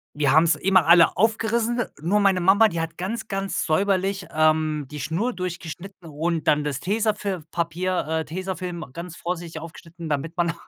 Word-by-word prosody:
Wir 145 -2 +2
haben's 160 +3 +5
immer 185 -3 +3
alle 170 -1 +6
aufgerissen, 225 +3 +1 0.2
nur 185 +7 +2
meine 195 -2 +3
Mama, 200 +5 +6
die 170 -5 -3
hat 165 0 -5
ganz, 220 +5 -4
ganz 195 -3 -2
säuberlich, 195 +3 +1
ähm, 155 -2 +2
die 150 - -7
Schnur 180 - -1
durchgeschnitten 180 0 -7
und 160 +2 -2
dann 150 0 +3
das 145 -3 -2
Tesafilm-Papier, 185 -5 -1
äh 160 0 -1
Tesafilm 180 0 -5
ganz 170 +1 -7
vorsichtig 170 -1 -5
aufgeschnitten, 165 0 -10
damit 155 +3 -2
man 170 -1 +1
175 Hz, 155 wpm, -24 LUFS, 160-195 Hz, 0.2 s, alle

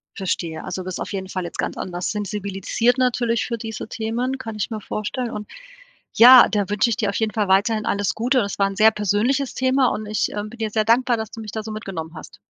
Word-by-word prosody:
Verstehe, 170 -4 -3
also, 185 - -4
bist 185 0 -5
du - - -7
auf - - -8
jeden 190 -1 -4
Fall 185 -1 -3
jetzt 170 - -8
ganz - - -2
anders 180 -1 -3
sensibilisiert, 210 +4 -1
natürlich 240 -2 +1
für 235 - -3
diese 220 -1 -6
Themen, 240 +5 -2
kann 225 -4 -7
ich 210 - -2
mir 220 -2 -5
vorstellen 230 +5 -4
und 210 0 -7 0.6
ja, 250 +1 +9
da 205 -2 -1
wünsche 210 +3 +2
ich 225 - -1
dir 210 - 0
auf 200 - -4
jeden 220 -1 0
Fall 210 -3 0
weiterhin 215 +3 +2
alles 200 -1 0
Gute 250 +4 +1
und - - +2
das 200 0 -5
war 195 - +4
'n 195 - -6
sehr 220 +2 +6
persönliches 220 +7 0
Thema 260 0 +2
und 215 - -5
ich, 215 0 0
ähm, 210 0 -4
bin 240 - -12
dir 220 - -1
sehr 215 0 +1
dankbar, 240 +2 +3
dass 220 -1 -5
du - - -9
mich 215 -2 -7
da 220 - -4
so 220 - -7
mitgenommen 185 -7 -6
hast. - - -11
215 Hz, 250 wpm, -22 LUFS, 200-235 Hz, 0.6 s, ja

